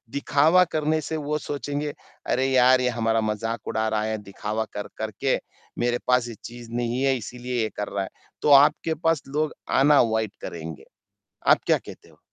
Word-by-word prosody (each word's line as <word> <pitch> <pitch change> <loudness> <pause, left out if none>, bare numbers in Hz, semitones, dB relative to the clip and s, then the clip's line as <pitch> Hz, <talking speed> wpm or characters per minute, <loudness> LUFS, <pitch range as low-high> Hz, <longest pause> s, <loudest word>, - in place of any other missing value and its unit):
दिखावा 150 +5 +4
करने 155 0 +1
से 160 +1 -3
वो 150 0 -2
सोचेंगे, 145 +1 -4 0.3
अरे! 130 +1 +1
यार, 130 -1 +5
ये 125 - +2
हमारा 115 -1 +1
मज़ाक 110 +2 -3
उड़ा 110 0 0
रहा 110 -1 0
है, 110 0 -1
दिखावा 105 +2 -3
कर 105 0 -5
कर 110 0 -2
के, - - +3 0.4
मेरे 120 0 +1
पास 125 -1 +3
ये 115 - -7
चीज़ 120 -1 -10
नहीं 120 +1 -1
है 135 -1 +3
इसीलिए 125 +1 -4
ये 110 - 0
कर 105 - -2
रहा 100 -1 0
है। - - -6 0.3
तो 150 - +4
आपके 160 +2 +1
पास 165 -3 +2
लोग 150 +2 -1 0.3
आना 145 +1 +6
अवॉइड 110 -3 +1
करेंगे। 80 -2 -7 0.6
आप - - +6
क्या - - +5
कहते - - -13
हो? - - -23
120 Hz, 190 wpm, -25 LUFS, 110-145 Hz, 0.6 s, आना